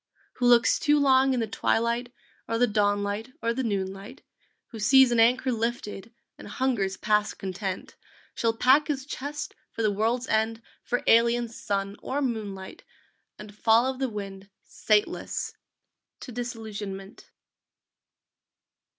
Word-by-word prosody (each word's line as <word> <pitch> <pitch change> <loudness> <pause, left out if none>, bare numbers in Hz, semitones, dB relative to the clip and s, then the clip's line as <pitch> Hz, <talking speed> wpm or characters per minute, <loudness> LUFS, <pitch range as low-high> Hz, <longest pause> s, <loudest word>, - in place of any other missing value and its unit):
Who 245 - +2
looks 240 -1 +5
too 295 -1 +3
long 265 -1 +4
in 250 -2 0
the - - 0
twilight, 235 +3 0 0.4
Or 230 - -1
the 245 - +4
dawn 205 -2 +1
light, 210 +5 -4
or 230 0 0
the 260 - -2
noon 195 -5 -1
light, 205 +8 -12 0.5
Who 225 - -9
sees 260 +4 +6
an 235 - +2
anchor 250 +3 +4
lifted 230 -2 -3 0.3
And - - -10
hungers 210 -8 -1
past 210 0 +1
content, 190 0 -5 0.4
Shall 230 -1 0
pack 265 +5 +4
his 275 -3 -2
chest 290 +1 -5 0.2
for 230 - -4
the 215 - +3
world's 225 +5 0
end, 225 +1 0 0.2
For 245 - -2
alien 235 +1 +4
sun 200 -3 -3
or 275 - -2
moonlight, 210 -8 -4 0.5
And 210 -1 -11
follow 230 +4 +3
the 260 0 -2
wind, 195 -2 -7
sateless, 210 -1 -1 0.7
To 255 - -8
Disillusionment! 215 -5 -7
230 Hz, 140 wpm, -26 LUFS, 205-250 Hz, 0.7 s, sees